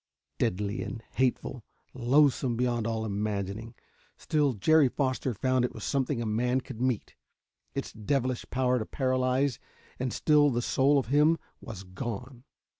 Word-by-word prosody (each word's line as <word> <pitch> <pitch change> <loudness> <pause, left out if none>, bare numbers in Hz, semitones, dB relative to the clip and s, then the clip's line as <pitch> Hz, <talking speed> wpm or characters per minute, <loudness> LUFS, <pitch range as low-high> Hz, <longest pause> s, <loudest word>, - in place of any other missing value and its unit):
Deadly 100 +3 -1
and 115 -3 -6
hateful 130 -1 -1 0.3
loathsome 130 0 +3
beyond 120 -2 0
all 110 -1 -1
imagining 105 +1 -3 0.4
still 150 -3 +1
Jerry 145 +7 +4
Foster 130 -1 -1
found 130 +3 +1
it 125 - -2
was 110 - -7
something 135 -2 0
a 115 - -2
man 125 +4 +1
could 125 -2 -9
meet. 125 -4 -1 0.6
Its - - -4
devilish 130 +2 -1
power 125 0 +1
to 110 - -3
paralyze 130 0 +1 0.4
and 130 -1 -1
still 150 -1 +4
the 120 -2 -1
soul 140 +4 +3
of 130 -4 -1
him 150 +4 +4 0.2
was 100 -4 -8
gone. 120 +7 -6
125 Hz, 145 wpm, -29 LUFS, 115-135 Hz, 0.6 s, Jerry